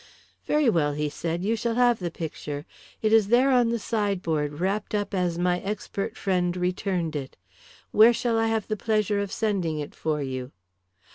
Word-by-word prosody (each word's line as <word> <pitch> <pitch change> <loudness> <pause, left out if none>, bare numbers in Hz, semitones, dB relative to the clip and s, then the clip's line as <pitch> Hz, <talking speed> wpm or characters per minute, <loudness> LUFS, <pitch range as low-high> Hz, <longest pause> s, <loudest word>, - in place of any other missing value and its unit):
"Very 300 -2 +3
well," 155 -9 +2
he 150 0 -1
said. 165 +3 -3
"You 220 +3 +1
shall 230 +1 -1
have 245 -2 +4
the 175 -2 -2
picture. 150 -3 -6 0.4
It 215 0 +3
is 220 -3 +5
there 250 +5 +4
on 245 -2 +4
the 235 - 0
sideboard 180 -10 -1
wrapped 200 +3 -1
up 205 -1 -2
as 180 -3 0
my 180 0 +1
expert 200 0 -4
friend 180 -2 0
returned 180 -2 -1
it. 135 -2 -5 0.5
Where 220 +3 +7
shall 235 -1 0
I 225 - +2
have 225 -2 -1
the 215 - -1
pleasure 215 -1 0
of 200 -1 -3
sending 190 -8 -1
it 145 -1 -5
for 155 -1 -2
you?" 130 -1 -5
195 Hz, 185 wpm, -26 LUFS, 165-220 Hz, 0.5 s, Where